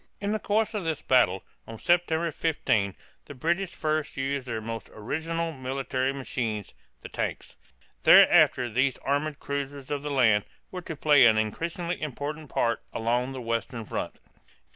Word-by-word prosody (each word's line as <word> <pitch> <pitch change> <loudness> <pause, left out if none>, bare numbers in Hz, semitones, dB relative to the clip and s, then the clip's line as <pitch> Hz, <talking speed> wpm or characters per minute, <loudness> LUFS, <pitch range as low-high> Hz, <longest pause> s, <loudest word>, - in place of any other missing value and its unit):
In 200 0 -2
the 215 - 0
course 215 +2 0
of 210 -3 -2
this 160 -3 -2
battle, 115 -8 +3 0.2
on 115 - -8
September 170 +1 +1
15, 110 - 0 0.3
the 145 - -10
British 170 +7 -1
first 155 -1 -2
used 135 0 -2
their 115 -2 -2
most 115 -1 -6
original 165 +9 -3
military 130 -1 -2
machines 120 -6 -4 0.3
the - - -8
"tanks." - - -4 0.5
Thereafter 125 -1 +6
these 130 +4 +1
armored 145 +2 -1
cruisers 140 -1 -5
of 145 -1 -1
the 145 - -4
land 115 -7 +3 0.3
were 185 - -5
to 165 -2 -6
play 145 -4 +6
an 110 -1 +4
increasingly 170 - -2
important 150 +1 -5
part 115 -1 0
along 120 +3 -1
the 130 - -6
western 115 0 -3
front. - - -4
140 Hz, 155 wpm, -27 LUFS, 120-160 Hz, 0.5 s, Thereafter